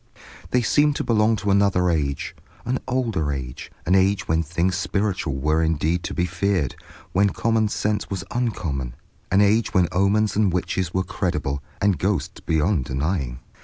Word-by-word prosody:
They 125 -1 +2
seemed 145 +4 +3
to - - -1
belong 110 -1 +3
to 100 -1 -1
another 100 -2 +3
age, 70 -4 -2 0.3
an 130 +2 0
older 115 - 0
age, 65 -3 -6
an 90 - +2
age 95 +1 +3
when 80 +1 +2
things 85 +3 0
spiritual 100 -8 -1
were 75 +4 +1
indeed 80 +2 +1
to - - -4
be 90 - +1
feared, 90 -4 0 0.4
when 100 +2 +3
common 110 +1 +1
sense 105 0 -1
was 95 -3 -3
uncommon, 80 - -2 0.3
an 95 +2 +4
age 105 +2 +2
when 90 -2 +4
omens 100 +3 +2
and 105 -2 +3
witches 90 0 -1
were 95 +1 0
credible, 75 -7 -2 0.2
and 100 -6 +2
ghosts - - -1
beyond 80 -2 +1
denying. 70 -2 -2
90 Hz, 165 wpm, -23 LUFS, 80-105 Hz, 0.4 s, an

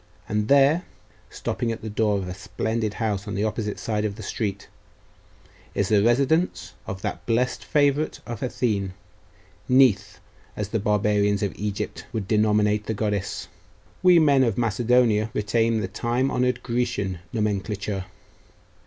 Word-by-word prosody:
And 105 +1 -1
here,' 140 +4 +5 0.5
stopping 115 - -3
at 115 - -6
the - - -4
door 105 -1 +1
of 95 -2 -4
a 90 - -4
splendid 110 +3 -3
house 105 -3 -2
on 105 - -4
the 100 - 0
opposite 110 -1 -2
side 105 -2 -2
of 105 -2 -2
the 110 - -9
street, 100 -1 -3 1.1
'is 100 - 0
the 105 -2 +4
residence 140 - +1
of 95 0 -6
that - - -3
blest 125 +2 0
favourite 145 +1 +1
of 115 -3 -6
Athene 105 -7 -1 0.8
Neith, 105 -7 +4 0.4
as 105 -2 -3
the 110 - 0
barbarians 105 0 +1
of 100 - -1
Egypt 105 -1 -4
would 110 -4 -3
denominate 105 -1 +2
the 110 - -1
goddess 105 -2 -2 0.5
we 180 -1 +6
men 145 -4 +5
of 115 -5 0
Macedonia 115 -1 +2
retain 115 +1 +1
the - - -2
time 125 +3 -1
honoured 125 0 0
Grecian 115 -7 -1
nomenclature.... 105 -2 -2
110 Hz, 145 wpm, -24 LUFS, 105-120 Hz, 1.1 s, we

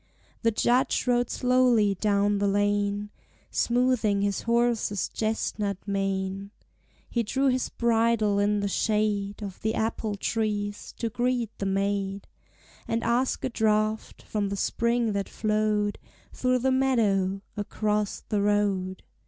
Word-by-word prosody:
The 230 - +3
Judge 240 +3 +2
rode 245 -1 +2
slowly 250 -5 +3
down 205 +1 +1
the 200 - +1
lane, 205 +1 0 0.4
Smoothing 235 -5 +2
his 200 -1 0
horse's 235 -4 +1
chestnut 215 -2 -2
mane. 195 0 -2 0.6
He 235 - 0
drew 265 +5 +1
his 255 0 0
bridle 225 -3 +2
in 205 0 +2
the 200 - 0
shade 210 0 0
Of 195 -2 -7
the 220 +1 0
apple 220 -1 -1
trees, 205 -1 -2
to 230 - -2
greet 240 -1 -1
the 195 - -1
maid, 195 0 -1 0.6
And 230 0 -1
ask 240 +3 +1
a - - 0
draught 215 -1 0
from 205 -2 -2
the 200 - -3
spring 235 +2 +1
that 200 -1 -2
flowed 215 -1 0 0.3
Through 255 0 +1
the 260 +2 +1
meadow, 205 -8 +1
across 210 0 -1
the 210 -2 -1
road. 200 -2 0
210 Hz, 130 wpm, -27 LUFS, 200-235 Hz, 0.6 s, The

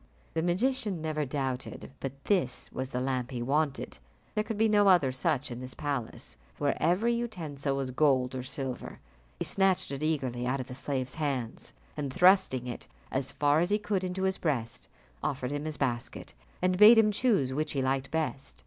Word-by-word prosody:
The 160 - 0
magician 205 +2 0
never 155 -1 -1
doubted 130 -2 -4
but 135 0 -6
this 170 -12 0
was 130 0 -4
the 125 - -2
lamp 130 -1 -1
he 125 -3 -4
wanted. 145 +2 -1 0.3
There 215 - +1
could 220 -1 -4
be 220 +1 +4
no 205 -1 +4
other 175 -9 +5
such 130 +1 -1
in 120 - -5
this 130 0 -7
palace, 140 -6 -4 0.2
where 145 -1 +1
every 185 +9 +3
utensil 155 -12 -2
was 135 -2 -2
gold 130 -2 +2
or 130 - -3
silver. 130 0 -5 0.4
He - - -3
snatched 190 -6 +2
it 140 0 -4
eagerly 130 -6 -1
out 135 +2 0
of 130 - -3
the 125 - -8
slave's 130 -1 -2
hand, 135 -7 -3 0.2
and 140 -3 -3
thrusting 180 -7 +4
it 120 -1 -6 0.2
as 135 0 -1
far 145 +1 +3
as 175 +2 +1
he 205 - +3
could 205 -2 -1
into 185 +1 -2
his 190 0 0
breast, 120 -8 -2 0.3
offered 130 -2 -2
him 145 +1 -3
his 155 -1 -3
basket, 120 -4 -3 0.3
and 185 0 +2
bade 220 +3 +10
him 215 -1 +5
choose 200 - +2
which 155 +2 -1
he 135 -2 0
liked 135 0 0
best. 150 -3 -3
145 Hz, 190 wpm, -29 LUFS, 130-180 Hz, 0.4 s, bade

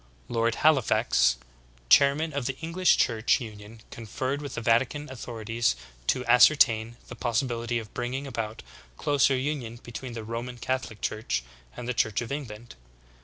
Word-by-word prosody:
Lord 115 0 +1
Halifax, 110 - +3 0.5
chairman 140 - +4
of 140 -3 -2
the 135 -1 -3
English 170 +3 +2
Church 115 +2 +2
Union 110 -1 -10
conferred 130 +5 -4
with 145 - -6
the - - -3
Vatican 125 +6 +1
authorities 115 - -2 0.3
to 125 - +1
ascertain 120 -2 +5
the 125 - -8
possibility 120 0 -1
of 110 -2 -7
bringing 125 +3 -3
about 115 -5 -5 0.3
closer 140 -2 +2
union 130 -4 -3
between 120 +1 -7
the 115 -1 -6
Roman 120 +3 -5
Catholic 125 -3 -3
Church 110 - -2 0.3
and 125 - -6
the 125 - 0
Church 110 -3 +1
of 120 +1 -5
England. 120 -5 -6
120 Hz, 145 wpm, -27 LUFS, 115-135 Hz, 0.5 s, ascertain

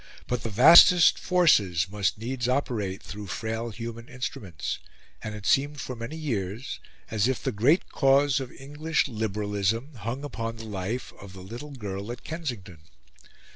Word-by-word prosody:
But 125 -2 -2
the 115 - -4
vastest 165 - +8
forces 105 - +3
must 100 +1 -1
needs 120 +2 -3
operate 110 -8 -1
through 105 +1 -8
frail 115 +4 -3
human 115 +2 -7
instruments; 105 - -5 0.4
and 105 -1 -5
it 105 -1 -9
seemed 145 +5 +2
for 130 -1 -5
many 115 +6 -6
years 115 - -3 0.3
as 110 0 +2
if 130 -4 -1
the 135 - 0
great 125 - +2
cause 140 -1 +3
of 130 -2 -6
English 150 +4 -1
liberalism 105 +3 -2
hung 115 +6 -4
upon 115 -5 -4
the 115 0 -9
life 105 +4 -4
of 100 -2 -11
the 95 -1 -10
little 120 +9 -8
girl 100 -2 -5
at 120 - -8
Kensington. 120 - -6
115 Hz, 155 wpm, -27 LUFS, 105-135 Hz, 0.4 s, vastest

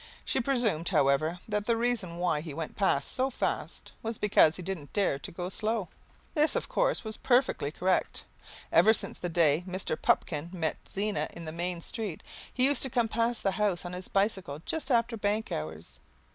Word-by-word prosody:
She - - +1
presumed, 235 - +1
however, 155 +1 +2
that 210 -1 -2
the 230 -1 +2
reason 225 -8 -1
why 175 -4 +1
he 155 -3 -7
went 160 -1 -5
past 145 -8 +1
so 260 +1 +2
fast 260 - -3
was 225 -2 -3
because 180 -6 +4
he 180 - -5
didn't 170 -6 -6
dare 195 -9 +1
to - - -7
go 175 +1 -4
slow. 215 0 -1 0.4
This, 305 -1 +3
of - - -1
course, - - +1
was 220 -1 -4
perfectly 245 - +2
correct. 185 +3 0 0.5
Ever 220 - +6
since - - -2
the 175 - -3
day 160 -2 +3
when 185 0 -6
Mr. 185 -4 -1
Pupkin 155 +1 +1
met 170 -4 -2
Zena 205 +1 -1
in 170 - -8
the 155 - -5
Main 175 +1 -3
Street 205 -3 -4 0.3
he 255 - +3
used 280 -1 +5
to 265 - +5
come 235 -3 +1
past 230 +1 0
the 195 - +2
house 195 -3 0
on 175 - -5
his 180 0 -4
bicycle 190 -7 -1
just 320 -4 -2
after 235 -2 +2
bank 210 +1 -1
hours. 75 -4 -6
190 Hz, 195 wpm, -29 LUFS, 165-230 Hz, 0.5 s, Ever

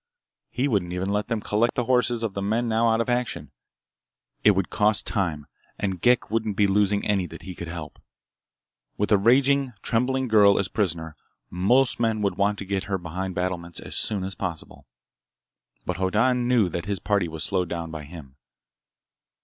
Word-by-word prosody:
He 130 +3 -1
wouldn't 95 -8 0
even 90 +2 -2
let 105 +1 -1
them 115 -2 -2
collect 115 +4 +1
the 125 - 0
horses 125 -2 +1
of 110 -4 -2
the 100 - -3
men 110 +4 0
now 115 +1 +2
out 110 0 +2
of - - -2
action. 120 - -2 0.9
It 105 -2 +6
would 95 -1 -1
cost 105 -1 +2
time, 85 -9 -1 0.3
and 95 -3 -3
Ghek 125 -2 +3
wouldn't 110 -3 -1
be 105 - +4
losing 100 +1 +2
any 95 -3 +1
that - - -11
he 95 - -7
could 85 -1 -7
help. 85 -2 -8 1.0
With 105 - -1
a 105 - +5
raging, 130 +4 +3
trembling 130 +3 0
girl 105 -3 +5
as 95 -2 0
prisoner, 85 -6 -2 0.4
most 120 +9 +2
men 110 -2 0
would 100 - +1
want 100 +1 +1
to 100 - -6
get 95 0 -2
her 95 +1 -1
behind 90 +1 -5
battlements 90 -1 -3
as - - -6
soon 100 -4 -1
as 95 +1 -3
possible. 90 -10 -6 1.0
But 90 - -2
Hoddan 115 +7 +1
knew 120 -6 +3
that 85 0 -4
his 100 -1 -1
party 100 +1 0
was 80 -1 -5
slowed 90 -3 -1
down 85 -1 -4
by 80 -2 -7
him. 70 -4 -12
100 Hz, 185 wpm, -25 LUFS, 90-115 Hz, 1.0 s, It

